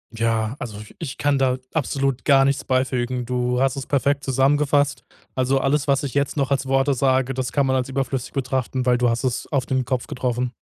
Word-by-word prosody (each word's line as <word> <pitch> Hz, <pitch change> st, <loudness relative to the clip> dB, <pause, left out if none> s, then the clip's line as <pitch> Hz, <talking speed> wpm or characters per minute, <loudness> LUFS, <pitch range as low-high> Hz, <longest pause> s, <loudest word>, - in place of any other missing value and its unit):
Ja, 115 Hz, 0 st, 0 dB
also 110 Hz, -4 st, -6 dB
ich 105 Hz, -, -12 dB
ich 145 Hz, -5 st, -5 dB
kann 145 Hz, -1 st, +1 dB
da 130 Hz, -1 st, +2 dB, 0.2 s
absolut 135 Hz, -4 st, -1 dB
gar 135 Hz, -2 st, +5 dB
nichts 140 Hz, 0 st, 0 dB
beifügen. 130 Hz, -1 st, -1 dB
Du 125 Hz, 0 st, -1 dB
hast 135 Hz, 0 st, +2 dB
es 135 Hz, -, -5 dB
perfekt 140 Hz, 0 st, +1 dB
zusammengefasst. 145 Hz, +2 st, +2 dB, 0.3 s
Also 130 Hz, +1 st, +1 dB
alles, 140 Hz, +2 st, +1 dB
was 140 Hz, 0 st, +2 dB
ich 140 Hz, -, -4 dB
jetzt 140 Hz, +1 st, 0 dB
noch 140 Hz, 0 st, 0 dB
als 135 Hz, -1 st, 0 dB
Worte 135 Hz, +1 st, +2 dB
sage, 130 Hz, 0 st, +1 dB
das 130 Hz, -1 st, -3 dB
kann 140 Hz, -2 st, +2 dB
man 130 Hz, 0 st, +1 dB
als 130 Hz, 0 st, -1 dB
überflüssig 135 Hz, -1 st, -2 dB
betrachten, 130 Hz, -1 st, -2 dB
weil 125 Hz, -1 st, +3 dB
du 125 Hz, -, +3 dB
hast 115 Hz, 0 st, -1 dB
es 125 Hz, -3 st, -2 dB
auf 135 Hz, -4 st, +1 dB
den 130 Hz, -1 st, -1 dB
Kopf 125 Hz, 0 st, -2 dB
getroffen. 125 Hz, 0 st, -2 dB
130 Hz, 215 wpm, -22 LUFS, 125-140 Hz, 0.3 s, gar